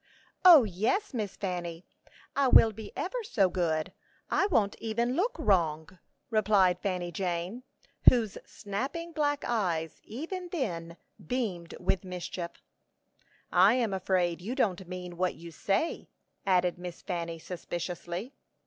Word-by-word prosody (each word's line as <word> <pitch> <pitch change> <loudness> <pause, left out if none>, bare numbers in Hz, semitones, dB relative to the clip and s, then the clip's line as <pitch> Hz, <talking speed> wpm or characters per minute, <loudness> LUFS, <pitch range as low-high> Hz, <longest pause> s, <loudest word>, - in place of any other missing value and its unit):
"O, 340 -7 +10
yes, 220 - 0
Miss 210 -5 -3
Fanny; 175 -3 -4 0.5
I 275 -1 +3
will 225 -3 +7
be 215 -1 -9
ever 485 +7 -2
so 200 - +2
good; 160 -4 0 0.4
I 395 - +3
won't 210 - +2
even 235 +2 0
look 460 - +1
wrong," 170 -3 +1 0.3
replied 205 -5 +4
Fanny 180 -3 -2
Jane, 180 +5 -3 0.5
whose 225 -5 0
snapping 265 +12 -5
black 290 -2 0
eyes 170 -9 -1
even 345 - -6
then 170 - -3 0.3
beamed 180 -5 -3
with 195 - 0
mischief. 180 -1 -6 0.9
"I 190 +6 +6
am 230 -5 +1
afraid 180 -2 0
you 225 +8 -4
don't 190 -8 0
mean 180 -1 -7
what 185 0 0
you 170 0 -10
say," 195 - -1 0.4
added 180 -1 +2
Miss 180 -1 -8
Fanny, 170 -2 -3
suspiciously. 175 - -5
190 Hz, 130 wpm, -30 LUFS, 175-240 Hz, 0.9 s, O